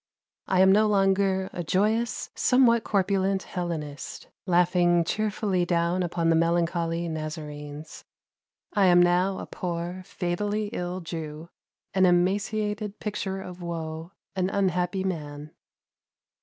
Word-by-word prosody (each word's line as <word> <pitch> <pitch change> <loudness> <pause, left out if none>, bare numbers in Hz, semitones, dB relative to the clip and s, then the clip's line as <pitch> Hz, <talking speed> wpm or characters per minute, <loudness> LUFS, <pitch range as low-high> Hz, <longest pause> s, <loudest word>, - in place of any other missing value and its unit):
I 185 -1 +3
am 190 0 +7
no 215 +2 +5
longer 195 -1 +2
a 175 - -3
joyous, 215 +7 0
somewhat 245 -3 +4
corpulent 195 -1 +1
Hellenist, 155 -6 -5 0.2
laughing 175 -1 +3
cheerfully 205 -1 0
down 175 +1 +1
upon 170 -1 0
the - - +4
melancholy 170 0 +1
Nazarenes. 155 -1 -6 0.7
I 200 -2 +4
am 175 -1 +6
now 180 +2 +3
a - - -5
poor 175 +1 -4
fatally 205 +4 -2
ill 180 +1 -3
Jew, 160 -1 -6 0.4
an 190 0 +4
emaciated 205 +3 0
picture 195 -2 -3
of 180 -1 -9
woe, 165 0 -5 0.2
an 185 0 0
unhappy 190 -1 0
man." 150 -5 -5
180 Hz, 115 wpm, -26 LUFS, 170-195 Hz, 0.7 s, am